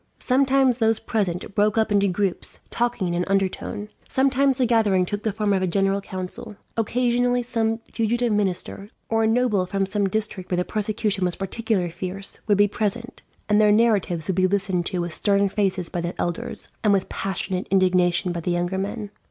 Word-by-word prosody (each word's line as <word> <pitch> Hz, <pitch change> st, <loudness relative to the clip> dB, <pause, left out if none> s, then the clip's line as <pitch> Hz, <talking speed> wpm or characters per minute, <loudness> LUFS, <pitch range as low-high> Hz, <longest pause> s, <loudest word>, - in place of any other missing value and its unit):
Sometimes 265 Hz, -1 st, +2 dB
those 225 Hz, -1 st, +3 dB
present 195 Hz, -5 st, -2 dB
broke 210 Hz, +1 st, +2 dB
up 220 Hz, -1 st, +2 dB
into 200 Hz, -1 st, +3 dB
groups, 190 Hz, 0 st, -2 dB
talking 240 Hz, -5 st, 0 dB
in 175 Hz, -, -2 dB
an 175 Hz, +1 st, 0 dB
undertone. 195 Hz, +1 st, -1 dB, 0.2 s
Sometimes 270 Hz, 0 st, +2 dB
the 260 Hz, -, +2 dB
gathering 215 Hz, -6 st, +3 dB
took 205 Hz, +3 st, -4 dB
the 220 Hz, -, -1 dB
form 210 Hz, 0 st, 0 dB
of 190 Hz, -, +1 dB
a 185 Hz, -, +1 dB
general 195 Hz, +2 st, +1 dB
council. 190 Hz, +3 st, -6 dB, 0.2 s
Occasionally 245 Hz, +2 st, +1 dB
some 225 Hz, -1 st, -1 dB
fugitive 235 Hz, +1 st, 0 dB
minister, 200 Hz, 0 st, -2 dB, 0.2 s
or 225 Hz, 0 st, +2 dB
a -, -, +3 dB
noble 225 Hz, -5 st, +2 dB
from 195 Hz, +1 st, 0 dB
some 200 Hz, 0 st, 0 dB
district 210 Hz, -2 st, -3 dB
where 180 Hz, -, 0 dB
the 180 Hz, -, 0 dB
persecution 210 Hz, -1 st, -1 dB
was 180 Hz, -1 st, +1 dB
particularly 195 Hz, -2 st, -1 dB
fierce, 185 Hz, +3 st, 0 dB
would 205 Hz, -2 st, +3 dB
be 205 Hz, 0 st, +5 dB
present; 220 Hz, +4 st, -3 dB, 0.3 s
and 210 Hz, 0 st, +4 dB
their 210 Hz, -1 st, +5 dB
narratives 205 Hz, -7 st, +2 dB
would 190 Hz, -, 0 dB
be 185 Hz, 0 st, +4 dB
listened 190 Hz, -3 st, 0 dB
to 180 Hz, -, -2 dB
with 170 Hz, -1 st, -4 dB
stern 200 Hz, +1 st, +3 dB
faces 190 Hz, -3 st, 0 dB
by 175 Hz, -, -3 dB
the 170 Hz, +1 st, -5 dB
elders, 175 Hz, +8 st, -2 dB
and 210 Hz, -2 st, +4 dB
with 195 Hz, -2 st, +1 dB
passionate 190 Hz, 0 st, -3 dB
indignation 180 Hz, -2 st, +2 dB
by 170 Hz, -, -3 dB
the 170 Hz, -, -3 dB
younger 175 Hz, +2 st, -1 dB
men. 205 Hz, +1 st, -4 dB
200 Hz, 190 wpm, -23 LUFS, 185-225 Hz, 0.3 s, be